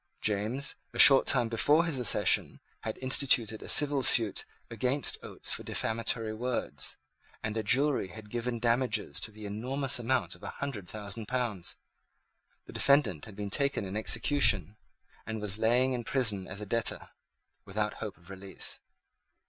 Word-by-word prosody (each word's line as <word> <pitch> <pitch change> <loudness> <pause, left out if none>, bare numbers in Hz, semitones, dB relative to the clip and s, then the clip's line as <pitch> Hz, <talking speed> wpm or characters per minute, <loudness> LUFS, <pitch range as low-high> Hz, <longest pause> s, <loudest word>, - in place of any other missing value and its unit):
James, 110 +7 -1 0.2
a - - -7
short 135 -2 +8
time 125 -4 +4
before 145 +9 +3
his 155 -6 -2
accession, 120 - +3 0.2
had 110 - -5
instituted 125 -5 +2
a - - -9
civil 145 -2 +5
suit 115 -4 +2 0.3
against 125 +4 -1
Oates - - -6
for - - -3
defamatory 115 0 -1
words; 115 - -3 0.5
and 110 0 -3
a 110 - 0
jury 130 +1 +2
had 105 +2 -12
given 120 0 -3
damages 115 -2 0
to - - -2
the 110 0 -11
enormous 125 +6 0
amount 125 +2 0
of - - -13
a - - -6
hundred 110 -10 -5
thousand 105 +1 -6
pounds. 120 -8 -3 0.9
The - - -12
defendant 140 - +2
had 110 - -12
been 100 -1 -5
taken 140 -5 +1
in 95 +1 -6
execution, 110 -3 +3 0.5
and 110 -1 -4
was 105 0 -1
lying 125 +4 +2
in 120 -1 -3
prison 105 -7 -1
as 95 +2 -7
a - - -5
debtor, 110 0 -2 0.5
without - - -2
hope - - -6
of 85 +4 -16
release. 95 0 -7
115 Hz, 155 wpm, -30 LUFS, 105-130 Hz, 0.9 s, short